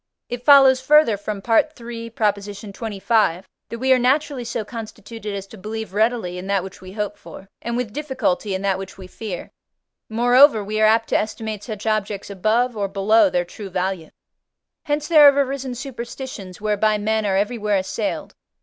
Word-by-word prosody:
It 245 0 -5
follows, 265 -2 +7
further, 300 -4 +5
from 205 0 -6
III. 235 -2 0
xxv., 205 -2 -1 0.3
that 230 - -5
we 260 +2 +3
are 255 - +3
naturally 270 +1 +1
so 230 -2 -4
constituted 215 -1 -7
as 195 -1 -5
to 205 +1 -14
believe 215 0 -6
readily 215 -4 0
in 185 - -8
that 200 -2 +1
which 190 0 -10
we 185 0 -10
hope 210 -1 -3
for, 195 - -12
and 235 0 -3
with 240 -4 -3
difficulty 225 -9 -1
in 190 - -4
that 195 -1 +1
which 195 -1 -8
we 190 - -10
fear; 185 0 -7 0.6
moreover, 245 +1 +5
we 215 +2 -2
are 215 - +6
apt 225 +1 +2
to - - +3
estimate 215 -1 -4
such 215 -3 -7
objects 210 -2 -2
above 225 +5 +1
or 200 -2 -1
below 200 +2 +3
their 175 -1 0
true 195 +3 -9
value. 185 -2 -3 0.8
Hence 295 0 -1
there 310 -3 +7
have 280 - -5
arisen 270 -2 -1
superstitions, 240 -6 -7
whereby 215 0 +1
men 220 +1 0
are 195 -2 +1
everywhere 210 0 0
assailed. 190 0 -3
215 Hz, 175 wpm, -21 LUFS, 200-240 Hz, 0.8 s, follows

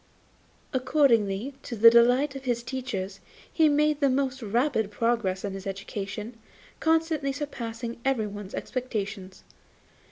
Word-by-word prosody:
Accordingly, 255 -4 +2
to 235 - -6
the 230 +1 +8
delight 250 +4 +4
of 270 0 -8
his 240 -2 0
teachers, 215 -7 -4 0.3
he 320 -2 +4
made 300 0 +2
the 280 -2 +3
most 265 0 0
rapid 230 0 0
progress 210 -4 0
in 200 - -3
his 195 +1 -7
education, 205 +3 -5 0.4
constantly 320 -3 +1
surpassing 235 -5 -5
everyone's 210 -7 -2
expectations. 200 -6 -4
235 Hz, 120 wpm, -27 LUFS, 205-270 Hz, 0.4 s, the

